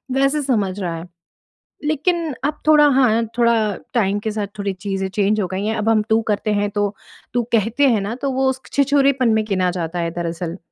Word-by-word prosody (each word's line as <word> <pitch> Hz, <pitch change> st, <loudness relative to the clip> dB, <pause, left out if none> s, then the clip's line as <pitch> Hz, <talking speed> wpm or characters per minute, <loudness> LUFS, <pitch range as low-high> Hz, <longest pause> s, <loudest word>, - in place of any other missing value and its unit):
वैसे 275 Hz, +2 st, +2 dB
समझ 210 Hz, -8 st, 0 dB
रहा 175 Hz, -4 st, -3 dB
है। 170 Hz, +2 st, -8 dB, 0.8 s
लेकिन 315 Hz, +1 st, 0 dB
अब 300 Hz, 0 st, -2 dB
थोड़ा 300 Hz, -1 st, +7 dB
हाँ 230 Hz, -3 st, +3 dB
थोड़ा 235 Hz, -1 st, +4 dB, 0.4 s
टाइम 205 Hz, -3 st, +1 dB
के 220 Hz, +1 st, -3 dB
साथ 210 Hz, -1 st, -3 dB
थोड़ी 200 Hz, -1 st, -2 dB
चीज़ें 195 Hz, 0 st, -3 dB
चेंज 205 Hz, +1 st, +1 dB
हो 185 Hz, -, -1 dB
गई 190 Hz, +2 st, -2 dB
हैं 220 Hz, +1 st, 0 dB
अब 215 Hz, +1 st, 0 dB
हम 220 Hz, -1 st, +4 dB
तू 220 Hz, +1 st, +3 dB
करते 210 Hz, 0 st, 0 dB
हैं 205 Hz, 0 st, 0 dB
तो 205 Hz, 0 st, -1 dB, 0.4 s
तू 245 Hz, -1 st, +1 dB
कहते 230 Hz, +6 st, +3 dB
हैं 225 Hz, -4 st, +2 dB
ना 200 Hz, +3 st, -3 dB
तो 275 Hz, -1 st, 0 dB
वो 265 Hz, +1 st, +1 dB
उसके 260 Hz, 0 st, -5 dB
छिछोरेपन 275 Hz, -2 st, +3 dB
में 220 Hz, 0 st, +2 dB
गिना 185 Hz, -3 st, +1 dB
जाता 175 Hz, -1 st, -4 dB
है 170 Hz, 0 st, -1 dB
दरअसल। 170 Hz, +1 st, -4 dB
215 Hz, 205 wpm, -20 LUFS, 195-265 Hz, 0.8 s, थोड़ा